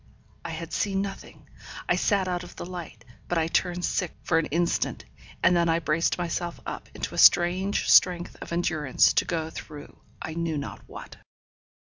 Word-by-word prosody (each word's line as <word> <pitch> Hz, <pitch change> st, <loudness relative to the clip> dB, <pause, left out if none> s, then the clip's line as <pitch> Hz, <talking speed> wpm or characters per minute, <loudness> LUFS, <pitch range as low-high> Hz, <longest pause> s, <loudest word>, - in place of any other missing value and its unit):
I -, -, -5 dB
had 165 Hz, +1 st, -6 dB
seen 195 Hz, -1 st, 0 dB
nothing; 195 Hz, -1 st, -9 dB, 0.4 s
I -, -, +3 dB
sat 200 Hz, -3 st, +1 dB
out 180 Hz, -1 st, -2 dB
of 175 Hz, -, -12 dB
the -, -, -6 dB
light; 170 Hz, -10 st, -8 dB, 0.2 s
but 175 Hz, -, -1 dB
I 160 Hz, -, +2 dB
turned 175 Hz, +1 st, 0 dB
sick 180 Hz, -4 st, -1 dB
for 165 Hz, -, +2 dB
an 165 Hz, -, -2 dB
instant, 170 Hz, +2 st, -1 dB, 0.4 s
and 180 Hz, -, +5 dB
then 170 Hz, -1 st, +2 dB
I 165 Hz, -, +3 dB
braced 165 Hz, 0 st, 0 dB
myself 175 Hz, 0 st, -3 dB
up -, -, -6 dB
into -, -, -4 dB
a -, -, -2 dB
strange 185 Hz, +3 st, +4 dB
strength 175 Hz, -2 st, +4 dB
of -, -, -8 dB
endurance 160 Hz, -5 st, +2 dB
to -, -, +2 dB
go 160 Hz, -2 st, -3 dB
through 150 Hz, -2 st, -10 dB, 0.2 s
I 160 Hz, -, -6 dB
knew 165 Hz, -1 st, -2 dB
not 140 Hz, -, -6 dB
what. -, -, -10 dB
170 Hz, 180 wpm, -26 LUFS, 160-180 Hz, 0.4 s, and